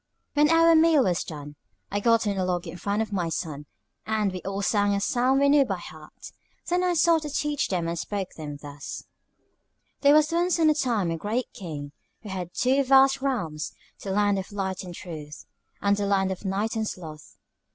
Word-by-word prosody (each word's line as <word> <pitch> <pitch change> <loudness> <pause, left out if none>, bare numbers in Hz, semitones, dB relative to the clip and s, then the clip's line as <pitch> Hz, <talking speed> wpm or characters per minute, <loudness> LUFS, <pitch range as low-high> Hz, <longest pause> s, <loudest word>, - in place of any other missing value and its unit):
When 295 +1 +4
our 330 0 +6
meal 320 -3 +5
was 180 -2 0
done, 145 -2 -9 0.3
I 205 - 0
got 230 +1 +3
on 205 -1 0
a 190 - 0
log 180 -1 -1
in 165 0 -7
front 205 +4 -1
of 215 - -8
my 175 -4 -1
sons, 150 -3 -4 0.4
and 215 -2 +1
we 185 -1 -6
all 195 +1 -4
sang 205 -1 +2
a - - 0
psalm 250 +6 +2
we 280 - +4
knew 285 0 +6
by 195 -8 -3
heart. 155 -3 -12 0.4
Then 355 +1 +1
I 360 -1 +1
sought 330 0 +4
to 300 - -5
teach 295 0 -1
them 175 -3 -1
and 170 0 -3
spoke 200 0 -3
to - - -20
them 150 -2 -6
thus: 145 -1 -8 1.0
"There 285 +1 +5
was 305 0 +4
once 345 +1 +1
on 315 -1 +5
a - - +3
time 230 - 0
a 165 - -2
Great 225 +8 -3
King, 150 -6 -7 0.3
who 210 - -8
had 180 -2 -5
two 265 +2 +2
vast 270 0 +5
realms, 170 - -2 0.3
the 195 - -6
Land 205 0 +2
of 190 - -7
Light 190 -2 -3
and 175 -2 -8
Truth, 155 -5 -9 0.4
and 200 0 +3
the 200 0 -2
Land 195 -1 +2
of 190 +2 -6
Night 205 +4 -1
and 220 -1 -1
Sloth. 155 -6 -9
200 Hz, 215 wpm, -26 LUFS, 175-270 Hz, 1.0 s, our